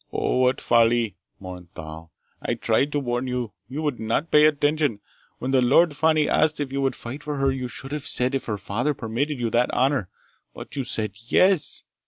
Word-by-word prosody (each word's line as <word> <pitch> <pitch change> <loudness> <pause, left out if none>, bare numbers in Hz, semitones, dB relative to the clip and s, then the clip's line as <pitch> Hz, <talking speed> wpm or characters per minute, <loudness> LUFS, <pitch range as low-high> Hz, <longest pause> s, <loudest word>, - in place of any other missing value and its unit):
"Oh, - - 0
what 130 0 +3
folly!" 115 -3 +3 0.2
mourned 90 -2 -9
Thal. 80 +1 -9 0.3
"I - - -1
tried 140 +2 +1
to 145 - +1
warn 120 -1 -2
you! 125 -3 -3 0.2
You 145 +4 -4
would 145 -5 -1
not 115 +9 -1
pay 150 0 +7
attention! 145 -5 +1 0.4
When 130 - -3
the 130 -1 +4
Lady 155 +6 +4
Fani 155 0 +2
asked 155 -1 +2
if 140 -2 -3
you 140 - -1
would 135 -1 0
fight 130 +5 -7
for 150 0 -4
her, 135 0 +2
you 130 -1 -3
should 135 +2 -8
have 150 -1 -4
said 125 +2 0
if 135 - -2
her 105 -2 -2
father 120 +9 -1
permitted 125 +6 -2
you 115 -2 -1
that 120 +2 +2
honor. 130 -7 +1 0.5
But - - -9
you 135 -2 -2
said 105 -3 -1 0.2
yes! 185 +4 +3
130 Hz, 205 wpm, -24 LUFS, 115-145 Hz, 0.5 s, pay